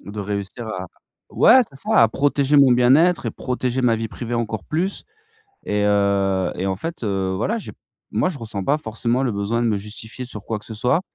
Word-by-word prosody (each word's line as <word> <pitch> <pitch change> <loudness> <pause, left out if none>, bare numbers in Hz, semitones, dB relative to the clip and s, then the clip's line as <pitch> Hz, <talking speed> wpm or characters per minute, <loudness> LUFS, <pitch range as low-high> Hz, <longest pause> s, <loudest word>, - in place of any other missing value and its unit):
de 105 +1 -7
réussir 100 +3 -4
à 95 -3 -5 0.4
ouais! 260 - +6
C'est 135 - -21
ça! 135 - +2
À 115 - +5
protéger 140 +3 +1
mon 140 -2 +7
bien-être 140 +9 +4
et - - 0
protéger 125 0 -2
ma 115 -2 +3
vie 110 -1 -3
privée 120 +1 -5
encore 110 -3 -2
plus 180 +6 -2 0.6
et 105 0 0
heu 100 -2 +2
et 95 - -2
en 95 -1 -1
fait, 165 - -6
heu, 95 -2 -1
voilà, 215 - -1
j'ai - - -9
p - - -27 0.3
moi - - +1
je 170 -6 -5
ressens 110 -4 -5
pas 145 +7 +2
forcément 120 0 -1
le 120 - 0
besoin 105 +4 -1
de - - +1
me 110 -2 +1
justifier 110 +4 -8
sur 105 -4 -9
quoi 110 -2 -2
que - - -16
ce 110 - -7
soit. 125 +9 +1
115 Hz, 220 wpm, -21 LUFS, 100-130 Hz, 0.6 s, mon